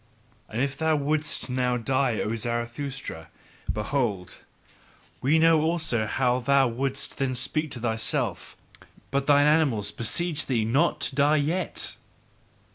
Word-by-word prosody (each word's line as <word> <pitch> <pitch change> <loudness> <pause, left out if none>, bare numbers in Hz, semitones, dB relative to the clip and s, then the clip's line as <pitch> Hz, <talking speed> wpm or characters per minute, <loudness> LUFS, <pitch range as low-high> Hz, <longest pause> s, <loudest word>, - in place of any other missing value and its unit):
And 115 +4 -1
if 140 0 -2
thou 160 +1 +1
wouldst 150 +1 0
now 125 -1 0
die, 125 0 0
O 110 - -2
Zarathustra, 120 - -4 0.4
behold, 105 -5 -2 0.8
we 145 +5 +3
know 160 -1 +5
also 160 -9 0
how 125 +2 +1
thou 135 +1 +3
wouldst 135 +3 -2
then 130 -2 0
speak 155 +5 0
to 125 - -7
thyself: 110 -1 -2 0.5
but 140 +1 0
thine 145 0 +5
animals 140 -10 +2
beseech 150 +7 -2
thee 115 -5 +1
not 145 +6 +1
to 140 -1 -1
die 145 +2 +4
yet! 155 +5 -1
135 Hz, 130 wpm, -26 LUFS, 120-150 Hz, 0.8 s, know